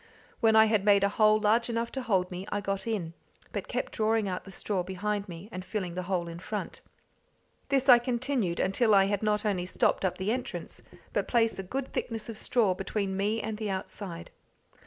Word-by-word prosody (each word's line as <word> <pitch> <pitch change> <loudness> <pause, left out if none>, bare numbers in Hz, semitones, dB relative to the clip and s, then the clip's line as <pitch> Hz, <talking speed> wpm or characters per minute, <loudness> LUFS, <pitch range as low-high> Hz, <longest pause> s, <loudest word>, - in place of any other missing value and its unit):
When 225 -3 +4
I 220 0 +8
had 215 -2 +2
made 200 -1 +5
a 200 - +4
hole 215 +1 +4
large 225 +3 +2
enough 230 0 -1
to 265 - -3
hold 190 -6 +1
me, 180 +2 -6
I 205 - 0
got 195 +2 -3
in, 185 -8 -2 0.4
but - - -3
kept - - -3
drawing 220 -1 +1
out 180 -1 -4
the - - -10
straw 195 0 -2
behind 200 +3 -3
me, 170 +3 -8
and 185 0 -6
filling 185 -3 -3
the 185 - -3
hole 175 -3 0
in 170 0 -7
front. 210 +3 -5 0.9
This 270 -1 +2
I 245 -2 +9
continued 240 -7 -1
until 210 +3 +3
I 195 -1 +6
had 200 0 0
not 210 0 +1
only 185 -4 0
stopped - - +1
up 185 - 0
the 190 +3 -1
entrance, 255 +1 -4 0.3
but - - 0
placed 230 -4 +2
a - - 0
good 260 +8 -5
thickness 225 -1 -3
of 225 - -5
straw 220 -7 +2
between 195 +1 -2
me 210 +3 0
and 220 0 -4
the 215 -2 -2
outside. 190 -2 -5
210 Hz, 210 wpm, -29 LUFS, 190-225 Hz, 0.9 s, I